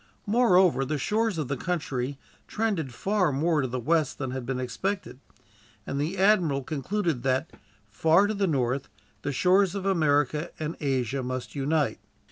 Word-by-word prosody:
Moreover, 190 - +4
the 150 +3 -2
shores 215 +5 0
of 155 -4 -2
the 140 - -1
country 140 -4 -3 0.3
trended 200 - -1
far 190 - +1
more 155 +3 +1
to 130 - -1
the 130 +1 -3
west 155 +3 +1
than 135 -3 -3
had 130 -2 -5
been 130 -1 -2
expected, 185 +6 -3 0.7
and 140 - -2
the 165 +6 -2
admiral 180 -8 +3
concluded 160 - -2
that, 135 +4 0 0.4
far 160 - +3
to 210 - -1
the 200 -2 0
north, 135 -3 0 0.3
the 145 - -2
shores 185 +6 +3
of 195 -1 -4
America 150 -3 +2
and 155 +1 -3
Asia 135 -2 -1
must 130 0 -4
unite. 145 +1 0
155 Hz, 160 wpm, -27 LUFS, 135-185 Hz, 0.7 s, Moreover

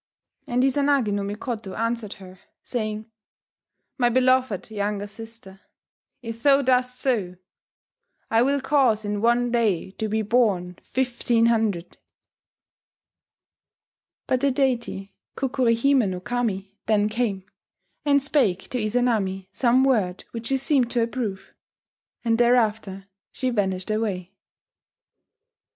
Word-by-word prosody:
And 250 -1 +1
Izanagi 270 -4 +2
no 205 - -1
Mikoto 210 0 -5
answered 230 -2 -2
her, 185 -2 -14 0.2
saying, 215 -2 -4 0.9
"My 240 -1 +4
beloved 255 -4 +2
younger 205 -1 -2
sister, 210 -2 -12 0.6
if 230 0 -7
thou 280 +1 +5
dost 250 -1 +1
so, 210 -10 0 1.0
I 225 0 +4
will 275 +2 +2
cause 260 -6 +2
in 205 0 -2
one 240 +1 +2
day 215 -7 +1
to 220 - -1
be 220 +1 0
born 200 -6 +1
fifteen 245 -2 0
hundred 220 -7 0 1.5
...." - - -72
But 255 -1 0
the 280 - +3
deity 245 -7 -1 0.2
Kukuri 255 -3 +1
hime 255 -3 +3
no 180 -1 -4
Kami 200 -2 -3
then 210 -1 +3
came, 215 -4 -2 0.6
and 280 -2 +3
spake 235 -11 +1
to 250 - -2
Izanami 215 -5 0
some 255 +1 +3
word 210 -9 +1
which 230 0 -6
she 270 - +2
seemed 265 -2 +1
to 240 -1 +1
approve, 230 -5 -4 0.7
and 230 0 +2
thereafter 220 -5 +2 0.3
she 255 -1 -2
vanished 190 -3 -1
away 200 -5 -2
230 Hz, 120 wpm, -24 LUFS, 205-250 Hz, 1.5 s, thou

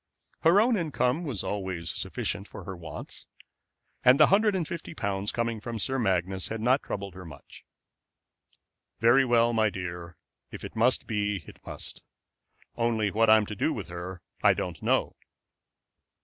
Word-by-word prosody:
Her 170 +5 +5
own 230 +1 +4
income 155 -2 0
was 125 - -1
always 95 -5 -3
sufficient 100 0 -4
for - - -10
her 95 +1 -6
wants, 85 -2 -8 0.8
and 125 +3 +6
the 150 - +9
hundred 210 0 +4
and 170 -5 -1
fifty 170 -1 -6
pounds 100 -3 -2
coming 115 -1 -1
from 115 +2 -5
Sir 130 +5 -1
Magnus 95 -3 0
had 110 - -4
not 125 +5 +3
troubled 100 -2 -5
her 95 +1 -9
much. 80 -4 -13 1.4
"Well, 120 0 +4
my 110 -1 +3
dear, 85 -3 -6 0.3
if - - -8
it - - -9
must 120 +3 +2
be 105 -4 -1
it - - -14
must; - - -6 0.7
only 115 -3 +1
what 115 +2 +3
I'm 110 -1 +6
to 105 - -6
do - - 0
with - - -6
her 90 +1 -7 0.2
I - - +5
do - - -1
not - - -16
know." - - +1
110 Hz, 165 wpm, -28 LUFS, 95-125 Hz, 1.4 s, the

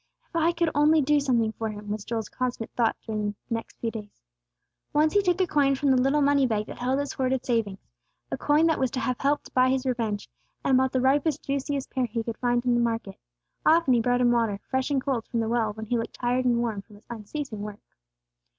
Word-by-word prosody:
"If - - -17
I 335 0 +3
could 340 -1 0
only 300 +2 +4
do 295 +2 +3
something 240 -6 +1
for 220 0 -4
Him!" 210 -1 -7
was 210 -1 -3
Joel's 225 0 -3
constant 250 -3 -3
thought 235 -2 +1
during 210 -2 -2
the - - -34 0.2
next 230 - -5
few 230 - -3
days. 210 -2 -9 0.7
Once 305 +1 +3
he 410 - +4
took 360 -2 +1
a 375 - +4
coin 285 -4 +2
from 275 +1 +1
the 255 -1 +4
little 280 +3 +2
money 280 -1 +4
bag 215 -2 -1
that - - -9
held 255 +3 0
his 285 -1 -3
hoarded 260 -1 -1
savings 225 -5 0 0.5
a - - 0
coin 300 +2 +3
that 325 -1 +2
was 260 - +1
to 255 - -3
have 255 -1 -1
helped 285 +1 -1
buy 255 0 +4
his 265 0 0
revenge 230 -5 -2 0.4
and 265 - +4
bought 260 0 +1
the 260 - +1
ripest, 285 +3 +2
juiciest 275 0 -2
pear 255 -2 0
he 230 0 -3
could 225 -1 -5
find 245 0 +1
in 245 - +3
the 240 - +2
market. 230 -4 -2 0.4
Often 320 -4 +4
he 235 - +3
brought 245 +1 +1
Him 240 -1 +4
water, 225 -4 +1
fresh 260 +1 -1
and 280 -2 +2
cold 255 -4 -2
from 235 - -2
the 225 - 0
well 225 -2 +1
when 220 +1 -7
He 235 +2 0
looked 230 - -5
tired 250 +1 0
and 240 -1 +3
warm 230 -4 -1
from 210 +1 -18
His 205 - -19
unceasing 225 +1 -6
work. 210 0 -7
250 Hz, 240 wpm, -26 LUFS, 225-275 Hz, 0.7 s, only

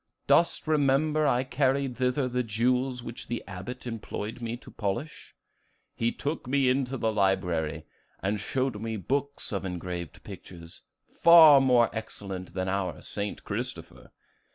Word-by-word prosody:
Dost 170 - +3
remember 150 +1 +2
I 125 -1 +2
carried 135 0 0
thither 125 +1 +1
the 125 0 -1
jewels 125 +3 0
which 120 0 -8
the 120 0 -3
Abbot 100 +7 -7
employed 115 0 -5
me 115 0 -3
to - - -14
polish? 105 +9 -4 0.6
He 115 +1 0
took 145 -2 -4
me 135 0 +3
into 135 0 0
the 110 -2 0
library, 90 -6 0 0.3
and 100 +2 -1
showed 130 +2 -2
me 110 -1 -3
books 140 +8 -2
of 100 - -2
engraved 90 -3 -5
pictures, 85 -2 -11 0.3
each - - -32
far 160 -4 +9
more 125 -3 +4
excellent 95 -5 -6
than 95 0 -1
our 95 -5 -2
'St. 105 0 -4
Christopher. - - -6
120 Hz, 145 wpm, -28 LUFS, 95-135 Hz, 0.6 s, far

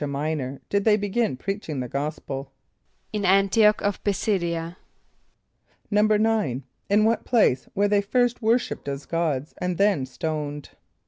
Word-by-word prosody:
a] - - -1
M[=i]´nor 140 -1 -3
did 200 0 0
they 210 -1 +4
begin 205 - -1
preaching 190 -3 -4
the 125 - -3
gospel? 140 0 -4 0.6
=In 210 - -1
[)A]n´t[)i] 195 +3 +5
och 210 - -3
of 205 -1 -1
P[+i] 205 - +2
s[)i]d´[)i] 185 -4 0
[.a].= 165 +1 -5 1.2
=9.= 210 - +2 0.3
In 210 +2 +4
what 230 +1 +1
place 210 - +2
were 205 +1 +3
they 205 0 +3
first 245 +4 +1
worshipped 230 -5 0
as 140 0 -4
gods 155 -4 -1
and 180 -1 -1
then 195 -10 +2
stoned? 150 0 -4
190 Hz, 150 wpm, -24 LUFS, 145-210 Hz, 1.2 s, A]n´t[)i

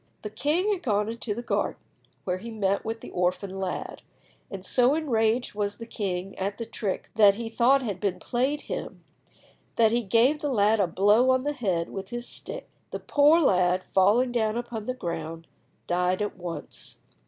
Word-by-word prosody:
The 210 - -5
king 345 - +1
had 370 - -4
gone 210 - 0
into 230 -2 -3
the 240 - -5
garden, - - -1 0.4
where 180 0 -2
he 230 +4 -8
met 200 -3 0
with 225 +1 -4
the - - -9
orphan 185 +2 -1
lad; 190 -1 -4 0.5
and 195 -1 -7
so 250 +7 +3
enraged 240 -6 +1
was 205 -1 -2
the 230 - -7
king 195 -4 -4
at 200 +1 -2
the 230 - -4
trick 210 -3 -4
that 205 -2 +7
he 230 +1 -5
thought 255 +4 +3
had 205 -6 -3
been 200 -3 -1
played 265 +5 -1
him, - - -6 0.7
that 225 -1 +4
he 240 +1 +2
gave 235 +8 +3
the 295 - -2
lad 215 -3 +3
a 195 - +3
blow 205 +8 +4
on 260 0 +3
the 295 +1 -1
head 185 -11 -1
with 195 -1 -6
his 240 0 -5
stick. - - -5 0.2
The - - -5
poor 295 +3 +4
lad, 185 - +3
falling 215 +7 +4
down 220 -2 0
upon 235 -3 -5
the 255 - -2
ground, 165 -6 -5 0.4
died 180 +3 +1
at 205 - -4
once. 175 -2 -7
220 Hz, 190 wpm, -26 LUFS, 190-245 Hz, 0.7 s, that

